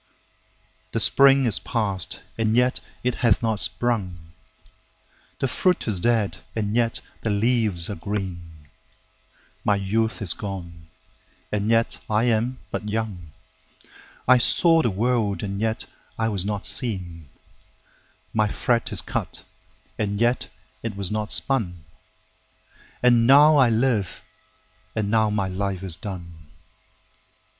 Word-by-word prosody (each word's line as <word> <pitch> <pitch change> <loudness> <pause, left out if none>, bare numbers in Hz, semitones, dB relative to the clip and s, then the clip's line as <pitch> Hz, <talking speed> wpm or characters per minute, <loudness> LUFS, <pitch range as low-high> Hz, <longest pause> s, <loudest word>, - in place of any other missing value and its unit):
7The 115 - 0
spring 135 +6 +6
is 110 -4 +1
past, 100 -6 -2
and 110 0 0
yet 125 +1 +2 0.2
it 125 0 +1
hath 115 -2 +3
not 110 -2 0
sprung,8The 95 0 -5
fruit 180 +5 0
is 100 -5 +1
dead, 115 -1 0 0.2
and 105 -1 -2
yet 115 -1 0 0.2
the 115 - -2
leaves 105 -5 +4
are - - -4
green,9My 95 +1 -7
youth 110 +3 0
is 90 - -1
gone, 85 -5 -8 0.6
and 105 0 -1
yet 115 0 +2
I 110 +1 +2
am 120 +2 0
but 105 - -4
young,10I 95 +4 -3
saw 165 +4 +4
the 120 - +1
world, 110 0 0
and 100 0 -4
yet 110 0 -1 0.3
I 115 0 0
was 100 -3 +2
not 105 0 -3
seen,11My 95 - -5
thread 120 -2 0
is 95 -5 +1
cut, 105 -3 -4 0.6
and 100 -1 -1
yet 120 +2 +1 0.3
it 115 -3 -5
was 100 -1 +3
not 105 0 -3
spun,12And 95 - -2
now 145 +3 +7
I 130 -4 +5
live, 115 -5 0 0.7
and 105 -2 -1
now 110 -1 +3
my 105 -2 -1
life 95 0 -3
is 90 -4 0
done. 85 -5 -9
105 Hz, 120 wpm, -23 LUFS, 95-115 Hz, 0.7 s, now